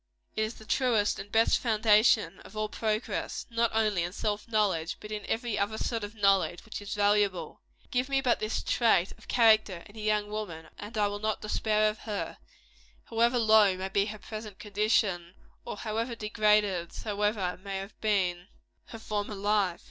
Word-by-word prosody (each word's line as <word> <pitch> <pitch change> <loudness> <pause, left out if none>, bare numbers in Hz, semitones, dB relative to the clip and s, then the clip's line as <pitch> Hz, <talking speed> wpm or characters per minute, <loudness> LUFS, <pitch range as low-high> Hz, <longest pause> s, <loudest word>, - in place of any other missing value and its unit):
It - - 0
is 215 +2 -3
the 220 - -14
truest 225 -4 +1
and 200 +1 -8
best 225 +1 +4
foundation 220 -1 +3
of 215 - -13
all 215 0 -1
progress, 215 +1 -2
not 230 0 +2
only 215 -4 +1
in 175 +1 -3
self 210 +1 -2
knowledge, 200 -7 0
but 210 - -10
in 210 -1 -4
every 230 -2 -1
other 205 +2 -1
sort 230 -1 -2
of 205 +2 -7
knowledge 195 -3 +2
which 220 - -7
is 205 +1 -5
valuable. 205 -5 +1 0.3
Give 250 +2 0
me 275 0 +2
but 255 -3 +2
this 215 +1 -2
trait 220 -6 +2
of - - -19
character 215 -6 +4
in 205 - -16
a - - -9
young 210 -1 0
woman, 185 -7 -5
and 210 +2 -7
I 205 -1 +3
will 205 0 -4
not 215 0 -2
despair 215 0 +1
of 215 0 -2
her, 210 -3 -5 0.7
however 235 +2 +3
low 215 -4 +5
may 190 +1 -4
be 200 +1 +1
her 215 0 -6
present 215 0 -8
condition, 200 -4 0 0.3
or - - -5
how 220 +1 -2
degraded 210 -5 +1
soever 205 -3 -1
may 195 -1 -4
have 195 +2 -8
been 185 -4 0 0.4
her 225 - -9
former 210 -1 -3
life. 200 -3 +1
210 Hz, 180 wpm, -29 LUFS, 200-220 Hz, 0.7 s, low